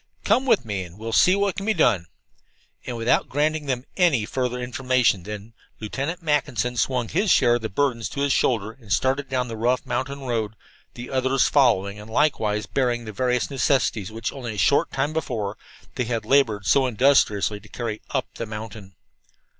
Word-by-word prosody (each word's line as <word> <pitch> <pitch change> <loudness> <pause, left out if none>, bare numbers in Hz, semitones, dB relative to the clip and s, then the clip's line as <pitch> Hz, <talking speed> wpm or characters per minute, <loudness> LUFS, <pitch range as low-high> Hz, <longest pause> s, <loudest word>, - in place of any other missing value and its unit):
"Come 265 +1 +2
with 230 - +3
me 100 -4 -3
and 90 +1 -12
we'll 115 +1 -5
see 185 +9 +5
what 200 -2 0
can 195 - -4
be 220 - +2
done." 105 - +2 0.8
And 125 -2 -4
without 115 +1 +1
granting 150 +1 0
them 130 -1 -2
any 160 - +3
further 125 +1 -2
information 125 -4 +1
then, 105 +4 -8 0.3
Lieutenant 140 - -4
Mackinson 140 -6 0
swung 125 +1 0
his 195 - 0
share 120 -7 +5
of - - -11
the 110 - -3
burdens 115 -2 0
to 140 - -4
his 140 -1 +2
shoulder 110 -6 +1
and 115 -4 -15
started 135 +4 +1
down 130 -1 -1
the 115 - -5
rough 120 +3 0
mountain 140 0 -3
road, 115 -4 -2 0.4
the 120 +1 -8
others 130 0 +2
following, 105 -8 +2
and 105 +1 -11
likewise 110 -6 +1
bearing 120 -1 -1
the 110 - -6
various 125 +4 0
necessities 125 -6 0
which, 115 +1 -4
only 120 -5 -6
a - - -8
short 140 +8 +3
time 140 +3 -1
before, 110 -10 -3 0.4
they 125 - -2
had 115 -2 -2
labored 110 -6 +2
so 135 +5 +4
industriously 110 -4 +2
to 105 +1 -17
carry 115 -2 -4
up - - -1
the 115 - -5
mountain. 105 -3 -8
125 Hz, 185 wpm, -24 LUFS, 110-140 Hz, 0.8 s, see